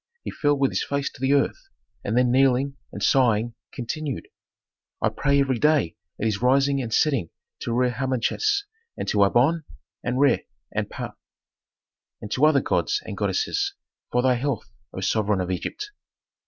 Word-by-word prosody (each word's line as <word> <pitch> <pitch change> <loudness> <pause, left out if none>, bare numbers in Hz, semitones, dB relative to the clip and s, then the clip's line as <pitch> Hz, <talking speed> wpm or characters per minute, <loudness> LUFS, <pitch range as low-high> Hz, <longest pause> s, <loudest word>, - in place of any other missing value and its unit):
He - - -4
fell 145 -1 +2
with 135 -1 +2
his - - 0
face 140 0 -2
to 130 - -16
the 135 +1 +3
earth, 385 - 0 0.3
and 110 +4 -1
then 125 -1 +4
kneeling, 135 +1 +3 0.2
and - - -6
sighing, 120 -3 +3 0.2
continued, 140 +2 -4 0.7
"I - - +2
pray 140 0 +1
every 135 -3 +1
day 150 - +3 0.2
at - - -1
his 110 -2 0
rising 135 +2 +3
and 115 -3 -5
setting 130 - +2 0.3
to - - -4
Re 125 +1 +2
Harmachis, 135 - 0 0.3
and - - -4
to 105 - +2
Amon, 135 +11 +3 0.4
and 120 +1 -1
Re, 140 -2 +3 0.3
and - - -1
Ptah, - - -6 1.1
and 105 - -8
to 150 +4 +4
other 145 -3 +4
gods - - 0
and - - -5
goddesses, 400 -2 0 0.4
for 125 - +2
thy 130 -1 +4
health, 125 0 -2 0.2
O 95 - -6
sovereign 105 0 +1
of 90 0 -2
Egypt! 415 - -4
130 Hz, 165 wpm, -24 LUFS, 120-140 Hz, 1.1 s, then